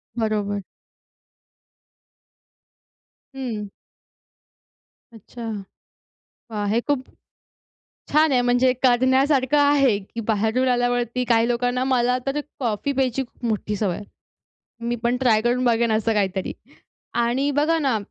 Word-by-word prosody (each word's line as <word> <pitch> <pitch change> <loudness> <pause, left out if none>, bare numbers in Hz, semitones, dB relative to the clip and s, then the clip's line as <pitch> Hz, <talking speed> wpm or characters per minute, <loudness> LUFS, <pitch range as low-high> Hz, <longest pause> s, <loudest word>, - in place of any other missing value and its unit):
बरोबर. 210 -3 -1 2.7
हं. 225 -6 -4 1.5
अच्छा. 230 +2 -11 1.1
वाह! 210 -2 -2
हे 230 +2 +2
खूप 280 -3 0 1.1
छान 305 0 +4
आहे. 250 -1 +3
म्हणजे 245 +1 +3
करण्यासारखं 260 +3 +3
आहे, 285 -6 +4
की 210 +4 -9
बाहेरून 220 +4 +1
आल्यावरती 245 0 0
काही 230 0 +4
लोकांना 245 +1 0
मला 250 -1 +2
तर 275 +2 -1 0.2
कॉफी 235 +3 -1
प्यायची 265 -1 0
खूप 240 0 -11
मोठी 210 -1 -1
सवय 195 -4 -1
आहे. 205 - -8 0.8
मी 240 - 0
पण 240 +1 +1
ट्राय 220 -4 +4
करून 245 +2 +1
बघेन 235 -1 +2
असं 220 +1 +1
काहीतरी. 190 -2 -1 0.6
आणि 240 +4 +1
बघा 305 +4 +2
ना, 265 -7 +1
245 Hz, 115 wpm, -23 LUFS, 220-260 Hz, 2.7 s, छान